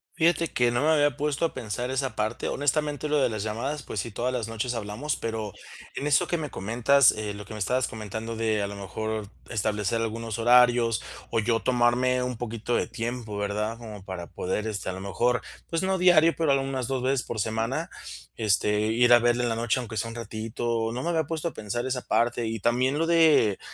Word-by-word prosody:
Fíjate 165 Hz, 0 st, +3 dB
que 120 Hz, -5 st, +1 dB
no 120 Hz, -, 0 dB
me 155 Hz, -, +3 dB
había 145 Hz, -3 st, +3 dB
puesto 145 Hz, +1 st, 0 dB
a 165 Hz, -, -2 dB
pensar 120 Hz, +1 st, -4 dB
esa 130 Hz, -3 st, -1 dB
parte, 110 Hz, +2 st, -2 dB
honestamente, 150 Hz, +1 st, 0 dB
lo 150 Hz, 0 st, +2 dB
de 130 Hz, -, +3 dB
las 110 Hz, -3 st, -3 dB
llamadas, 125 Hz, +7 st, -3 dB
pues 110 Hz, -, -4 dB
sí, 115 Hz, -, -3 dB
todas 120 Hz, +4 st, -2 dB
las 120 Hz, -4 st, -2 dB
noches 115 Hz, +2 st, -2 dB
hablamos, 115 Hz, +6 st, -3 dB
pero, 110 Hz, -3 st, -4 dB, 0.4 s
en 145 Hz, -, -2 dB
eso 145 Hz, -, +4 dB
que 175 Hz, -, 0 dB
me 155 Hz, -2 st, -4 dB
comentas, 120 Hz, +7 st, +4 dB
eh, 105 Hz, -1 st, -4 dB
lo 105 Hz, 0 st, -8 dB
que 105 Hz, -, -9 dB
me 105 Hz, -, -6 dB
estabas 125 Hz, +6 st, +1 dB
comentando 110 Hz, +1 st, -5 dB
de 110 Hz, -2 st, 0 dB
a -, -, -1 dB
lo 100 Hz, -, -7 dB
mejor, 110 Hz, +2 st, -4 dB, 0.2 s
establecer 110 Hz, 0 st, 0 dB
algunos 115 Hz, 0 st, -3 dB
horarios 120 Hz, -1 st, +5 dB, 0.3 s
o 115 Hz, -, +1 dB
yo 115 Hz, +1 st, +1 dB
tomarme 125 Hz, +1 st, +2 dB
un 125 Hz, 0 st, -2 dB
poquito 115 Hz, 0 st, -3 dB
de -, -, +1 dB
tiempo, 115 Hz, -2 st, -4 dB
¿verdad? 105 Hz, +2 st, -2 dB
Como 110 Hz, -4 st, -9 dB
para 95 Hz, -3 st, -6 dB
poder 95 Hz, +5 st, -3 dB
este, 105 Hz, -3 st, -3 dB
a -, -, -3 dB
lo 95 Hz, -, -7 dB
mejor, 120 Hz, +6 st, +1 dB, 0.3 s
pues 165 Hz, +2 st, -1 dB
no 190 Hz, 0 st, +1 dB
diario, 170 Hz, -2 st, +6 dB
pero 160 Hz, -3 st, +1 dB
algunas 135 Hz, -2 st, 0 dB
dos 130 Hz, -2 st, -2 dB
veces 130 Hz, 0 st, +2 dB
por 110 Hz, -, -5 dB
semana 115 Hz, +9 st, -1 dB, 0.5 s
este, 105 Hz, -1 st, +2 dB
ir 120 Hz, +2 st, +5 dB
a 120 Hz, -, +8 dB
verla 120 Hz, +1 st, +2 dB
en 120 Hz, -, +1 dB
la 115 Hz, -, 0 dB
noche, 115 Hz, +2 st, 0 dB
aunque 115 Hz, -3 st, -6 dB
sea 115 Hz, +3 st, -1 dB
un 115 Hz, -, -8 dB
ratito. 115 Hz, 0 st, -2 dB
No 125 Hz, +2 st, -4 dB
me 170 Hz, -, -1 dB
había 165 Hz, -2 st, +2 dB
puesto 165 Hz, +2 st, -3 dB
a -, -, -15 dB
pensar 110 Hz, +3 st, -3 dB
esa 130 Hz, -1 st, -2 dB
parte 120 Hz, 0 st, +1 dB
y 110 Hz, 0 st, -3 dB
también 125 Hz, +6 st, +1 dB
lo 165 Hz, -, +1 dB
de 160 Hz, -, +4 dB
120 Hz, 220 wpm, -26 LUFS, 110-130 Hz, 0.5 s, a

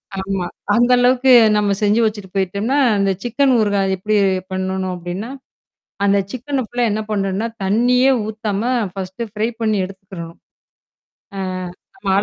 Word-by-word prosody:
ஆ, -, -, -6 dB
ஆமா. 190 Hz, -2 st, -2 dB, 0.3 s
அந்த 240 Hz, +2 st, +3 dB
அளவுக்கு 255 Hz, +1 st, +4 dB, 0.2 s
நம்ம 205 Hz, -1 st, +1 dB
செஞ்சு 210 Hz, +3 st, +3 dB
வச்சிட்டு 205 Hz, -3 st, -3 dB
போயிட்டோம்னா, 200 Hz, +8 st, 0 dB, 0.2 s
அந்த 195 Hz, -1 st, +2 dB
சிக்கன் 250 Hz, +2 st, +2 dB
ஊறுகாய் 200 Hz, -2 st, +1 dB
எப்பிடி 210 Hz, +3 st, 0 dB, 0.4 s
பண்ணணும் 185 Hz, 0 st, -2 dB
அப்பிடின்னா, 180 Hz, +7 st, -6 dB, 0.8 s
அந்த 200 Hz, 0 st, +4 dB
சிக்கன 260 Hz, 0 st, -2 dB
ஃபுல்லா 245 Hz, +1 st, 0 dB
என்ன 215 Hz, 0 st, -2 dB
பண்ணணும்னா, 200 Hz, +2 st, -1 dB, 0.2 s
தண்ணியே 250 Hz, +6 st, +3 dB, 0.2 s
ஊத்தாம 215 Hz, -1 st, -3 dB, 0.3 s
ஃபர்ஸ்ட் 190 Hz, +3 st, -5 dB
ஃப்ரை 220 Hz, +2 st, 0 dB
பண்ணி 215 Hz, -2 st, +1 dB
எடுத்துக்கிறணும் 185 Hz, -3 st, -10 dB, 1.0 s
ஆ -, -, -2 dB, 0.6 s
நம்ம. 200 Hz, -, -7 dB
205 Hz, 130 wpm, -19 LUFS, 190-235 Hz, 1.0 s, அளவுக்கு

